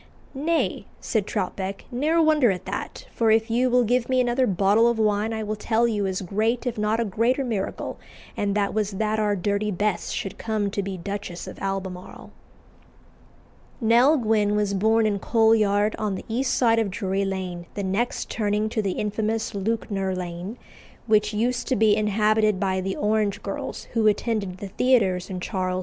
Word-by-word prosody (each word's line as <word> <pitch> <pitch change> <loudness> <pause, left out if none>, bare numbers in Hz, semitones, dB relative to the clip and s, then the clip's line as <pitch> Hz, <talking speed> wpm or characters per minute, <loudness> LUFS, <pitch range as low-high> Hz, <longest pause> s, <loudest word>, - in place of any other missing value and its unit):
"Nay," 320 +4 -1
said 215 -4 -1
Troutbeck, 190 +1 -3
"ne'er 300 +7 +1
wonder 310 -6 +4
at 185 -2 -2
that, - - -5
for 225 -1 +1
if 220 +1 +3
you 250 +2 +2
will 250 0 +4
give 245 +2 +1
me 255 0 +2
another 250 +1 +2
bottle 200 +4 +3
of 235 -1 +1
wine 215 0 +1
I 220 -1 -3
will 215 0 -2
tell 225 +2 +1
you 205 -4 0
as 190 0 -3
great 220 +7 0
if 245 - -1
not 210 +2 +1
a 235 - +1
greater 230 +7 +1
miracle, 220 -6 -3 0.4
and 200 -1 -1
that 205 -1 0
was 210 -2 -1
that 215 +2 0
our 210 -1 +1
Dirty 200 +2 -1
Bess 205 -1 -1
should 195 - -4
come 215 -3 -1
to 200 - -1
be 195 -1 -5
Duchess 195 -1 -5
of - - -9
Albemarle." 190 -2 -5 1.5
Nell 240 +6 +5
Gwynn 215 -4 +1
was 205 -1 0
born 220 +3 +3
in 205 -2 0
Coal 225 +2 +3
Yard, 210 -1 +2
on 210 -3 -1
the - - -7
east 245 +3 0
side 230 -2 +3
of 220 -3 0
Drury 195 0 -1
Lane, 185 -3 -4
the 200 - -3
next 195 +6 -1
turning 210 0 -1
to 220 0 -1
the 195 -3 -1
infamous 220 +3 -2
Lewknor 195 -2 -2
Lane, 180 +4 -5 0.5
which 210 -2 +3
used 240 +3 -1
to 260 - +1
be 215 -1 +4
inhabited 215 -1 +2
by 190 -1 0
the 190 +1 -3
orange 210 -1 0
girls 195 - -5
who 225 -2 +3
attended 210 -3 0
the 200 0 -7
theatres 190 -7 +2
in 185 -1 -4
Charles 185 -1 -2
II. - - -1
210 Hz, 185 wpm, -24 LUFS, 195-225 Hz, 1.5 s, Nell